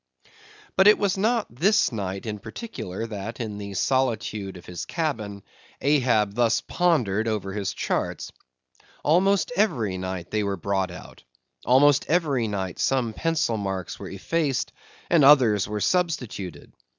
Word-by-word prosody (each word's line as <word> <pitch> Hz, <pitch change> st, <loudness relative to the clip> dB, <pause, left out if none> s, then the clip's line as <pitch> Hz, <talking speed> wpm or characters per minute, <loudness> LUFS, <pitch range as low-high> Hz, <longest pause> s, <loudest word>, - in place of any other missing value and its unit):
But 190 Hz, -, +5 dB
it 210 Hz, -, +8 dB
was 200 Hz, -2 st, +1 dB
not 225 Hz, +3 st, +1 dB
this 200 Hz, -, +3 dB
night 100 Hz, -3 st, -4 dB
in 105 Hz, -2 st, -4 dB
particular 115 Hz, -, -6 dB
that, 110 Hz, +1 st, -6 dB
in 105 Hz, -3 st, -4 dB
the 100 Hz, -1 st, -7 dB
solitude 110 Hz, -6 st, -1 dB
of 90 Hz, -, -14 dB
his 90 Hz, -1 st, -6 dB
cabin, 110 Hz, -, -3 dB, 0.4 s
Ahab 125 Hz, -8 st, +2 dB
thus 115 Hz, 0 st, +2 dB
pondered 115 Hz, -, +1 dB
over 105 Hz, -3 st, -2 dB
his 100 Hz, -1 st, -2 dB
charts. -, -, -2 dB, 0.7 s
Almost 180 Hz, +3 st, +3 dB
every 120 Hz, -, +1 dB
night 95 Hz, -2 st, -5 dB
they 110 Hz, -, +1 dB
were 100 Hz, -1 st, -2 dB
brought 95 Hz, 0 st, -1 dB
out; 90 Hz, -, -12 dB, 0.4 s
almost 135 Hz, +3 st, +5 dB
every 145 Hz, -8 st, +1 dB
night 95 Hz, -3 st, -4 dB
some 125 Hz, -4 st, +1 dB
pencil 160 Hz, -6 st, 0 dB
marks 95 Hz, -3 st, -4 dB
were -, -, -7 dB
effaced, 155 Hz, -6 st, -1 dB, 0.4 s
and 165 Hz, -4 st, +4 dB
others 125 Hz, -8 st, +6 dB
were 105 Hz, 0 st, -3 dB
substituted. 125 Hz, -, -2 dB
115 Hz, 140 wpm, -25 LUFS, 100-155 Hz, 0.7 s, it